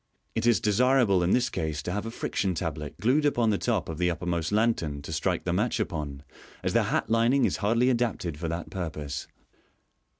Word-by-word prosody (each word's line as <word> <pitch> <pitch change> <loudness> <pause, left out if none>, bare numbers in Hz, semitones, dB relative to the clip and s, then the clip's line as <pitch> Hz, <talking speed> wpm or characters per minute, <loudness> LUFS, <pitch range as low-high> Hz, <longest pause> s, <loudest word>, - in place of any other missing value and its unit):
It 115 +1 0
is 120 - +5
desirable 115 -2 +3
in 85 - +1
this 125 +4 +2
case 75 -2 -3
to 90 - -3
have 105 +4 -3
a - - -3
friction 95 -4 -2
tablet 75 -3 -4
glued 130 +8 +3
upon 120 -6 +2
the 100 - 0
top 115 -7 0
of 80 -1 -6
the 90 0 +2
uppermost 85 0 -2
lantern 105 -10 +1
to 80 - -6
strike 85 +3 0
the 85 - -1
match 105 +6 0
upon, 75 -3 -3 0.4
as - - 0
the - - +3
hat - - -1
lining 120 +4 +4
is - - 0
hardly 115 +4 +2
adapted 115 - 0
for 85 - -3
that 85 +1 -4
purpose. 75 -6 -4
95 Hz, 200 wpm, -27 LUFS, 80-115 Hz, 0.4 s, is